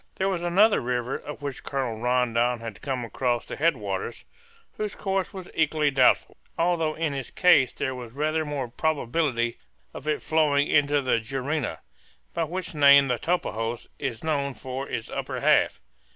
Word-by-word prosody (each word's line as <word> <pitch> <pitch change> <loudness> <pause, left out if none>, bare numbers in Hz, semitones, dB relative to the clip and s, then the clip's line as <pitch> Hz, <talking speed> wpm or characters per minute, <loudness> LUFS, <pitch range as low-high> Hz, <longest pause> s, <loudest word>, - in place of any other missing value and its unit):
There 190 +1 0
was 185 -3 -1
another 195 +5 +4
river, 125 +1 -2
of 150 0 -8
which 140 -3 -4
Colonel 125 -5 -3
Rondon 125 -1 +1
had 115 -2 -8
come 130 -3 -2
across 120 0 -1
the - - -6
head 160 -1 +2
waters, 100 +1 -4 0.5
whose 210 -1 -3
course 195 -5 -1
was 190 -2 -8
equally 155 -2 +2
doubtful, 130 -2 +3 0.2
although 165 -2 +1
in 160 -3 -1
its 135 -3 -5
case 155 -8 +4
there 130 - -3
was 125 -3 -8
rather 155 +4 0
more 145 -4 -3
probability 125 -3 -1 0.3
of 145 - -9
its 150 - -1
flowing 150 -2 +3
into 145 -1 +3
the 125 -3 +2
Juruena, 135 - -3 0.5
by 165 -1 0
which 180 +3 -5
name 140 -2 +7
the 125 -2 0
Tapajos 120 -9 -2
is 130 -5 -4
known 140 -4 -1
for 130 +1 -6
its 115 - -4
upper - - -4
half. - - +3
140 Hz, 165 wpm, -26 LUFS, 125-160 Hz, 0.5 s, name